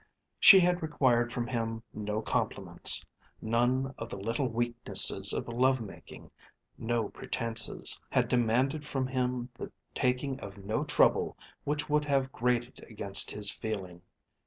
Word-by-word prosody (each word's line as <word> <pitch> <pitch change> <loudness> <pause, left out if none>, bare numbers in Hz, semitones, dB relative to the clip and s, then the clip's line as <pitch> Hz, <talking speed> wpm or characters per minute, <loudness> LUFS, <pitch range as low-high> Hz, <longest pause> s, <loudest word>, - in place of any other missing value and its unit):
She 195 - +9
had 180 0 +1
required 130 -6 +1
from 120 -1 -3
him 115 -2 -4
no 105 +1 -4
compliments, - - 0 0.3
none 125 +4 0
of 115 - -6
the - - -7
little 115 +7 -2
weaknesses 120 0 +4
of - - -3
love 130 +2 +1
making, 110 -4 -11 0.4
no 115 -2 -2
pretences, 115 -2 0
had - - +1
demanded 125 +5 +1
from 135 -3 -2
him 125 -1 -2
the - - -8 0.2
taking 130 +2 -1
of 100 0 -10
no 110 +7 -3
trouble 145 -3 +2 0.3
which 150 +1 -2
would 150 0 +1
have 135 -2 0
grated 120 0 -2
against 100 -3 0
his 105 -1 0
feeling. 95 -5 -6
120 Hz, 135 wpm, -29 LUFS, 115-130 Hz, 0.4 s, She